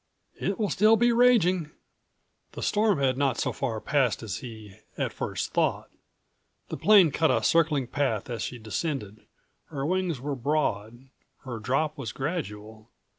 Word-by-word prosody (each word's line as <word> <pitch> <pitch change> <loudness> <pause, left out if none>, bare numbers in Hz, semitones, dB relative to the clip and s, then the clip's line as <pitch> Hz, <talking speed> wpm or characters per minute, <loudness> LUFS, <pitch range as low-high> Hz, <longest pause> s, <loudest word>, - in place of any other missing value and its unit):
"It 195 - -2
will 210 -3 -1
still 215 +3 +5
be 240 +1 +3
raging." 200 -9 +3 0.8
The - - -6
storm 210 -2 +2
had 135 -1 +1
not 135 -4 +1
so - - -1
far 115 -5 -3
passed 130 -2 0
as 100 -4 -4
he 110 -5 -10 0.2
at - - -2
first - - -4
thought. - - 0 0.8
The - - -4
plane 195 -7 +6
cut 160 +3 +2
a - - +1
circling 155 -5 +2
path 125 -5 -1
as 115 -3 -5
she 125 - -4
descended. 110 -2 -4 0.4
Her 140 -3 -5
wings 180 -3 -1
were 140 +3 -3
broad; 125 -3 -2 0.3
her 120 -4 -6
drop 140 +7 -1
was 125 - -4
gradual. 110 - -5
140 Hz, 155 wpm, -27 LUFS, 115-170 Hz, 0.8 s, plane